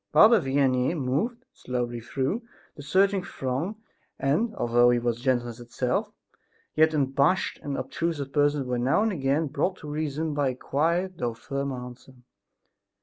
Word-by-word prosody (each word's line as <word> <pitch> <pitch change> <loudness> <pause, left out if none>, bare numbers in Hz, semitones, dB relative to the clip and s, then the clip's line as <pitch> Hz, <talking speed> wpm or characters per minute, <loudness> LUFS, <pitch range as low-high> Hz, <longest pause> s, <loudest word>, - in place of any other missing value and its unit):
Father 220 -1 +7
Vianney 135 +1 +1
moved, 160 - -1
slowly 120 -1 -3
through 135 - -2 0.3
the - - -9
surging 190 +6 +2
throng 135 +11 -3 0.4
and, 205 +12 0
although 120 +1 +4
he 120 - +3
was 120 -1 -1
gentleness 120 -3 0
itself, 120 +1 -2 0.6
yet 160 0 +4
unabashed 140 +5 +1
and 140 -1 -4
obtrusive 140 +1 -3
persons 145 -1 +2
were 125 -1 -1
now 130 - +2
and 225 - +1
again 145 -2 0
brought 170 +6 -1
to 150 - -10
reason 155 +1 -2
by 145 -2 +1
a 130 - -4
quiet 170 +7 -1
though 120 -2 -2
firm 140 +4 -4
answer. 125 +1 -9
140 Hz, 145 wpm, -26 LUFS, 125-160 Hz, 0.6 s, Father